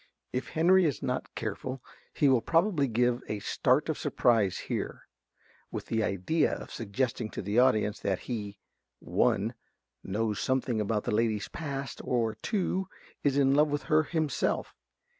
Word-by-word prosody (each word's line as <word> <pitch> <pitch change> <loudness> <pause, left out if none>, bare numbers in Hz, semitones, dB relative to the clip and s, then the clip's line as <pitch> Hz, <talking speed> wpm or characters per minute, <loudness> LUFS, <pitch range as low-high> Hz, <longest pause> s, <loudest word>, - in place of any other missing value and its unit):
(If 125 - -2
Henry 180 +3 +4
is 150 - -1
not 125 0 -3
careful 125 +4 -4 0.3
he 145 - +2
will 130 -3 +4
probably 165 - +2
give 120 +1 +1
a 105 - -2
start 100 - +1
of - - -2
surprise 110 -6 +2
here, - - -4 0.7
with - - -5
the 110 - 0
idea 105 - +1
of - - -9
suggesting 110 +1 -2
to - - -5
the 105 +5 +2
audience 110 -4 +3
that 95 -2 -1
he 105 -5 -5 0.4
(1) 110 +5 +1 0.5
knows 105 +1 -1
something 130 -4 0
about 105 0 0
the - - -2
lady's 110 -2 +1
past, 140 -6 -5
or 115 -3 0
(2) 190 - -1 0.4
_is 140 -1 +2
in 135 -1 +4
love 150 +2 +5
with 145 0 -2
her 155 - +7
himself. 155 -3 -1
125 Hz, 155 wpm, -29 LUFS, 110-145 Hz, 0.7 s, her